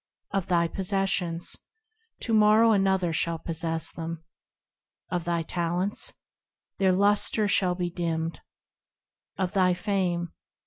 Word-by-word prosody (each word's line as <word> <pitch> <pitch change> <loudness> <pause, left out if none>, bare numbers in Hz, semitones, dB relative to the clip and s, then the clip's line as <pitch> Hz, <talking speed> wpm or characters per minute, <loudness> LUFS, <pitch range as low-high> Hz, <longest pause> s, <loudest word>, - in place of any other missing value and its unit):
Of 195 -2 -1
thy 170 -2 +3
possessions? 190 -2 -1 0.7
To 230 - -2
morrow 215 +1 +6
another 190 -4 +2
shall 165 +1 0
possess 165 0 -1
them. 165 -1 -6 0.9
Of 175 -2 -1
thy 170 -1 0
talents? 175 +4 -2 0.7
Their 190 -1 +4
lusture 205 +2 +3
shall 185 -2 +2
be 175 -1 -2
dimmed. 165 -1 -2 1.0
Of 185 -2 -1
thy 185 -2 +3
fame 175 -3 -1
180 Hz, 115 wpm, -27 LUFS, 170-195 Hz, 1.0 s, morrow